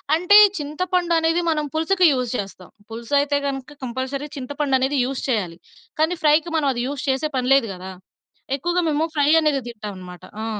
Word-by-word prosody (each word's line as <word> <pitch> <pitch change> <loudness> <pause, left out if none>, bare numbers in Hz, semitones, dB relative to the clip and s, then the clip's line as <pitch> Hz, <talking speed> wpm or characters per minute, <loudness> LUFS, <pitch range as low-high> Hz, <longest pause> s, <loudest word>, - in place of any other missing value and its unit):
అంటే 360 +5 +3 0.2
చింతపండది 335 +2 0
మనం 305 -2 0
పులుసుకి 360 +3 +2
యూజ్ 250 -3 -1
చేస్తాం. 195 -2 -7 0.2
పులుసు 230 +4 -8
అయితే 285 0 +1
గనుక 275 +1 -5
కంపల్సరీ 260 +3 -4
చింతపండనేది 270 0 -1
యూజ్ 270 0 -4
చేయాలి. 185 -8 -1 0.4
కానీ 320 +3 +2
ఫ్రైకి 310 +2 +3
మనం 300 -3 +1
అది 240 - -3
యూజ్ 280 -1 -5
చేసే 270 +4 0
పని 255 0 -1
లేదు 270 -5 +3
గదా! 185 +1 -9 0.7
ఎక్కువగా 350 +5 0
మేము 310 +1 +1
ఫ్రై 290 0 +2
అనేదే 290 -3 +1
తింటాం 210 -3 -7
అనమాట. 180 -1 -11 0.2
ఆ! - - -3
280 Hz, 165 wpm, -21 LUFS, 250-315 Hz, 0.7 s, అంటే